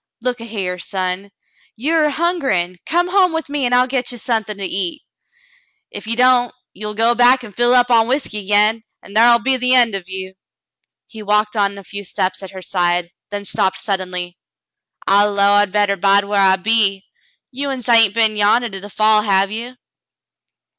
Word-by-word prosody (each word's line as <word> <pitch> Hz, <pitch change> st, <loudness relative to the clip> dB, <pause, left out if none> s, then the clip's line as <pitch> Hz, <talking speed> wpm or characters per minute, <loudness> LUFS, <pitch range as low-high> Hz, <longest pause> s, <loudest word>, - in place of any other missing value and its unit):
Look 245 Hz, -1 st, -3 dB
a 230 Hz, -, -8 dB
hyar, 190 Hz, -5 st, -4 dB
son, 185 Hz, +2 st, -4 dB, 0.5 s
you 275 Hz, +9 st, -2 dB
are 310 Hz, -2 st, +3 dB
hungerin'. 275 Hz, -, -1 dB
Come 350 Hz, +2 st, +1 dB
home 365 Hz, -2 st, +3 dB
with 320 Hz, -3 st, -4 dB
me, 285 Hz, -2 st, -2 dB
an' 245 Hz, -, -2 dB
I'll 250 Hz, 0 st, +4 dB
get 255 Hz, -1 st, -2 dB
ye 245 Hz, -, -7 dB
suthin' 220 Hz, -3 st, -2 dB
to 200 Hz, -, -4 dB
eat. 190 Hz, -, -3 dB, 0.9 s
Ef -, -, -8 dB
you 230 Hz, -, 0 dB
don't, 250 Hz, 0 st, +3 dB, 0.2 s
ye'll 210 Hz, +1 st, -7 dB
go 230 Hz, +2 st, +3 dB
back 245 Hz, +2 st, +4 dB
an' 225 Hz, -, -10 dB
fill 240 Hz, +4 st, +2 dB
up 245 Hz, 0 st, +3 dB
on 225 Hz, -1 st, +4 dB
whiskey 255 Hz, -5 st, -2 dB
agin, 210 Hz, +2 st, +3 dB, 0.2 s
an' -, -, -14 dB
thar'll 235 Hz, +2 st, +5 dB
be 260 Hz, +3 st, 0 dB
the 250 Hz, +1 st, +2 dB
end 240 Hz, -4 st, +4 dB
of 190 Hz, -2 st, -6 dB
ye." 190 Hz, 0 st, -7 dB, 0.7 s
He 220 Hz, -, -12 dB
walked 210 Hz, +1 st, 0 dB
on 200 Hz, -1 st, 0 dB
a 200 Hz, -, -10 dB
few 200 Hz, +2 st, -7 dB
steps 185 Hz, 0 st, -3 dB
at 190 Hz, -, -9 dB
her 190 Hz, 0 st, -10 dB
side, 175 Hz, -1 st, -1 dB, 0.2 s
then 205 Hz, 0 st, -6 dB
stopped 190 Hz, 0 st, 0 dB
suddenly. 180 Hz, -3 st, -4 dB, 0.7 s
"I 200 Hz, +1 st, +4 dB
'low 200 Hz, -1 st, +2 dB
I 205 Hz, 0 st, +4 dB
better 205 Hz, 0 st, 0 dB
bide 200 Hz, +1 st, +3 dB
whar 200 Hz, 0 st, -1 dB
I 190 Hz, -1 st, +5 dB
be. 195 Hz, -1 st, 0 dB, 0.5 s
You 280 Hz, +2 st, -3 dB
uns 260 Hz, -4 st, -5 dB
hain't 225 Hz, -4 st, +4 dB
been 220 Hz, -2 st, +2 dB
yandah 215 Hz, +3 st, +2 dB
to 195 Hz, -, -7 dB
the 205 Hz, +2 st, -11 dB
fall, 215 Hz, +1 st, +3 dB
have 195 Hz, -1 st, +1 dB
ye 235 Hz, +3 st, -6 dB
210 Hz, 195 wpm, -18 LUFS, 195-245 Hz, 0.9 s, thar'll